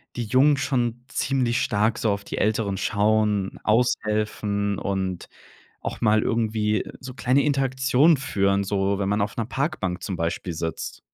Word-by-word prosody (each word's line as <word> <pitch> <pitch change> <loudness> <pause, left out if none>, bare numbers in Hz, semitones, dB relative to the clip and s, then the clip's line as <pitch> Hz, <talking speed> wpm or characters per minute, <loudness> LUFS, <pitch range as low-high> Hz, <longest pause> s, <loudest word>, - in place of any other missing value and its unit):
die 120 - -2
Jungen 135 +6 +4
schon 120 -3 -1
ziemlich 125 -3 0
stark 110 +2 +1
so 110 - +1
auf 100 0 -3
die - - -6
Älteren 105 -2 0
schauen, 105 -1 +1
aushelfen 105 -3 0
und 95 -2 -3 0.5
auch - - -5
mal 110 -2 +4
irgendwie 110 -2 0 0.2
so 130 -1 -8
kleine 125 +3 +2
Interaktionen 135 +2 +3
führen, 100 -6 +1
so, 100 0 0
wenn 95 - 0
man 105 +1 +1
auf 105 +3 -3
'ner 115 - -1
Parkbank 125 - -2
zum 95 - -3
Beispiel 85 +1 -2
sitzt. 80 0 -4
110 Hz, 150 wpm, -24 LUFS, 100-125 Hz, 0.5 s, Jungen